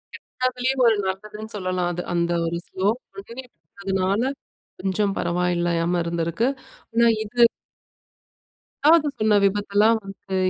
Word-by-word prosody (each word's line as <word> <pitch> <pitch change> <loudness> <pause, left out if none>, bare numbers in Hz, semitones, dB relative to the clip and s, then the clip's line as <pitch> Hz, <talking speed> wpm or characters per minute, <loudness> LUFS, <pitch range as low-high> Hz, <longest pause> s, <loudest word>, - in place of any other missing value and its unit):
கெட்டதிலேயும் 255 +1 -1
ஒரு 225 - +5
நல்லதுன்னு 210 +3 -5
சொல்லலாம். 185 -2 -1
அது 175 - -3
அந்த 170 0 +1
ஒரு 165 +1 -2
ஸ்லோ 190 +1 -2 0.3
பிகினீங்க 240 +5 -9 0.3
அதுனால 195 +2 0 0.6
கொஞ்சம் 195 +1 0
பரவால்லயாம 175 0 0
இருந்திருக்கு. 170 +6 -1 0.5
ஆனா 235 +1 +4 0.2
இது 240 +3 0 1.4
2வது 310 0 +6
சொன்ன 215 -1 +4
விபத்தெல்லாம் 205 +2 +3
வந்து 195 0 -7
195 Hz, 110 wpm, -23 LUFS, 180-225 Hz, 1.4 s, 2வது